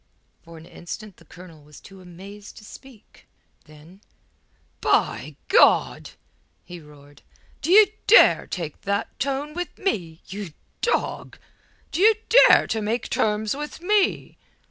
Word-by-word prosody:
For 165 Hz, 0 st, -14 dB
an 160 Hz, -, -14 dB
instant 195 Hz, +4 st, -10 dB
the -, -, -20 dB
Colonel 175 Hz, -3 st, -15 dB
was 150 Hz, +1 st, -16 dB
too 195 Hz, -1 st, -16 dB
amazed 195 Hz, +4 st, -13 dB
to 210 Hz, -, -14 dB
speak. 255 Hz, -1 st, -17 dB, 0.4 s
Then 155 Hz, +5 st, -18 dB, 0.8 s
"By -, -, -1 dB
God!" -, -, +3 dB, 0.6 s
he 175 Hz, -1 st, -10 dB
roared. 145 Hz, -2 st, -18 dB, 0.4 s
"D'ye 390 Hz, +8 st, +6 dB, 0.2 s
dare 455 Hz, -, +5 dB
take 165 Hz, -5 st, -7 dB
that 200 Hz, 0 st, -4 dB
tone 280 Hz, +2 st, -3 dB
with 355 Hz, -1 st, -6 dB
me, 175 Hz, -, -4 dB
you 195 Hz, -5 st, -8 dB, 0.3 s
dog? 475 Hz, -, -2 dB, 0.5 s
D'ye 425 Hz, +5 st, +4 dB, 0.3 s
dare -, -, +5 dB
to 220 Hz, -, -3 dB
make 220 Hz, +3 st, -3 dB
terms 215 Hz, +2 st, -1 dB
with 295 Hz, +1 st, -7 dB
me?" 400 Hz, +3 st, -1 dB
205 Hz, 125 wpm, -23 LUFS, 170-275 Hz, 0.8 s, D'ye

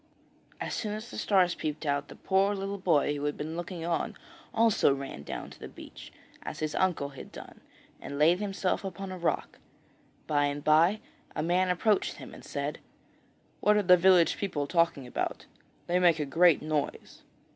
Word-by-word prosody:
As -, -, -4 dB
soon 210 Hz, -2 st, -2 dB
as 215 Hz, +3 st, -8 dB
the -, -, -7 dB
stars 185 Hz, -3 st, +3 dB
peeped 155 Hz, 0 st, -4 dB
out 145 Hz, 0 st, 0 dB
the -, -, -11 dB
poor 195 Hz, +1 st, +1 dB
little 195 Hz, +1 st, -4 dB
boy 155 Hz, -6 st, +2 dB
who 145 Hz, 0 st, -3 dB
had 145 Hz, -, -2 dB
been 155 Hz, +2 st, -5 dB
looking 175 Hz, -1 st, -5 dB
on 170 Hz, -1 st, -2 dB, 0.3 s
also 225 Hz, -9 st, +3 dB
ran 135 Hz, -, -7 dB
down -, -, -6 dB
to -, -, -14 dB
the -, -, -7 dB
beach, -, -, -12 dB, 0.3 s
as -, -, -6 dB
his 155 Hz, -1 st, -2 dB
uncle 175 Hz, -7 st, 0 dB
had 135 Hz, -, -11 dB
done, -, -, -11 dB, 0.4 s
and 140 Hz, -, -6 dB
laid 165 Hz, +5 st, +4 dB
himself 195 Hz, -2 st, -1 dB
upon 195 Hz, 0 st, -6 dB
a 185 Hz, -, -5 dB
rock. 170 Hz, -, -2 dB, 0.7 s
By 145 Hz, -1 st, +2 dB
and 145 Hz, 0 st, -3 dB
bye 165 Hz, +7 st, +4 dB, 0.3 s
a -, -, -1 dB
man 180 Hz, +2 st, +2 dB
approached 200 Hz, +4 st, +1 dB
him -, -, -11 dB
and -, -, -12 dB
said: -, -, -4 dB, 0.8 s
'What 210 Hz, 0 st, +4 dB
are 210 Hz, -, +2 dB
the 180 Hz, -1 st, +7 dB
village 180 Hz, -1 st, +5 dB
people 175 Hz, -8 st, -2 dB
talking 165 Hz, -3 st, +1 dB
about? 125 Hz, -, -3 dB, 0.4 s
They 175 Hz, +1 st, +1 dB
make 175 Hz, -3 st, +5 dB
a 150 Hz, -, 0 dB
great 165 Hz, +3 st, +4 dB
noise!' 155 Hz, -1 st, -3 dB
175 Hz, 185 wpm, -29 LUFS, 150-190 Hz, 0.8 s, the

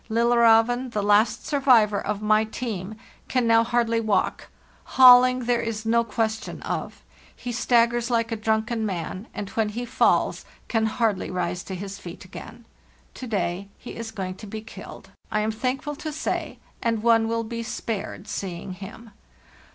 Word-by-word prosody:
'Lillerzeven, 235 Hz, +2 st, +4 dB
the 210 Hz, -, -1 dB
last 205 Hz, +2 st, +3 dB
survivor 240 Hz, -8 st, +3 dB
of 210 Hz, 0 st, -3 dB
my 215 Hz, 0 st, +4 dB
team, 215 Hz, -3 st, -5 dB, 0.3 s
can 255 Hz, -2 st, +1 dB
now 230 Hz, 0 st, +5 dB
hardly 230 Hz, -1 st, +1 dB
walk—hauling 250 Hz, +3 st, +4 dB
there 240 Hz, -1 st, +1 dB
is 225 Hz, -1 st, -4 dB
no 235 Hz, +1 st, +3 dB
question 225 Hz, +1 st, -3 dB
of: -, -, -5 dB, 0.3 s
he 245 Hz, -, -6 dB
stag 235 Hz, 0 st, +3 dB
gers 240 Hz, 0 st, -2 dB
like 230 Hz, -1 st, 0 dB
a -, -, 0 dB
drunken 220 Hz, +1 st, -1 dB
man, 185 Hz, +1 st, -4 dB
and 200 Hz, -1 st, -6 dB
when 220 Hz, -2 st, 0 dB
he 240 Hz, +4 st, -4 dB
falls -, -, +2 dB, 0.2 s
can 225 Hz, -1 st, +1 dB
hardly 220 Hz, -3 st, 0 dB
rise 180 Hz, -1 st, -2 dB
to 190 Hz, -, -6 dB
his 195 Hz, +1 st, -7 dB
feet 175 Hz, +2 st, -10 dB
again. 225 Hz, +5 st, -11 dB, 0.5 s
To 255 Hz, -, -8 dB
day 195 Hz, -3 st, -2 dB
he -, -, -10 dB
is 230 Hz, -1 st, -6 dB
going 190 Hz, -4 st, -5 dB
to 215 Hz, -, -10 dB
be 215 Hz, +2 st, -6 dB
killed, 220 Hz, -, -11 dB, 0.2 s
I 215 Hz, -, +1 dB
am 215 Hz, +1 st, 0 dB
thankful 260 Hz, +6 st, -2 dB
to 310 Hz, -, -5 dB
say, 305 Hz, -, -3 dB, 0.2 s
and 230 Hz, -2 st, -1 dB
one 225 Hz, -1 st, +4 dB
will 230 Hz, 0 st, -1 dB
be 230 Hz, +1 st, -5 dB
spared 220 Hz, -2 st, -5 dB
seeing 185 Hz, -3 st, -5 dB
him. 205 Hz, +4 st, -10 dB
225 Hz, 165 wpm, -24 LUFS, 210-235 Hz, 0.5 s, now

